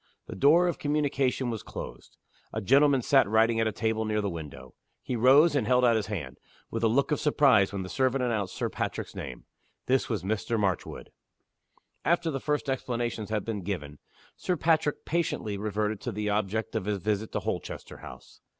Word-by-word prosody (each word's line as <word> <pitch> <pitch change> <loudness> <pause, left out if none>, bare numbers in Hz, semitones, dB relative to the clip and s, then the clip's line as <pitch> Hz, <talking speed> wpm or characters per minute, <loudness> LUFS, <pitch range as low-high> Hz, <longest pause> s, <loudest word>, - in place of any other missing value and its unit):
The - - -8
door 165 +6 +5
of 175 - -2
communication 140 -4 0
was 110 - -4
closed. - - -9 0.3
A 110 - -3
gentleman 135 +4 +4
sat 135 -6 +4
writing 115 +1 +3
at 110 - +2
a - - 0
table 110 +1 -1
near 110 -1 0
the 100 -2 -1
window. 80 -4 -8 0.3
He 125 - -3
rose, 140 +7 +5
and 130 -7 +1
held 125 0 +4
out 120 -1 +4
his 110 -2 -1
hand, 80 -12 -5 0.3
with 115 - -3
a 115 - +4
look 135 +7 +1
of 150 - +1
surprise, 135 -9 +4
when 100 -2 -4
the - - -6
servant 130 +4 0
announced 110 -6 -1
Sir - - -1
Patrick's - - -4
name. 65 -2 -7 0.4
This 130 +1 +1
was 110 -6 -2
Mr. 110 +3 -1
Marchwood. 95 -5 -2 0.9
After 170 -1 +1
the 135 - -3
first 150 +1 -1
explanations 120 -4 -2
had 110 -2 -2
been 110 -3 -3
given, 75 -6 -5 0.4
Sir 180 -2 -2
Patrick 155 -2 +1
patiently 150 -10 -1
reverted 105 0 -2
to 120 - -3
the 105 0 -2
object 105 +1 -1
of 110 -4 -1
his 105 -1 0
visit 105 +3 -2
to - - 0
Holchester - - -5
House. - - -13
115 Hz, 190 wpm, -28 LUFS, 105-135 Hz, 0.9 s, door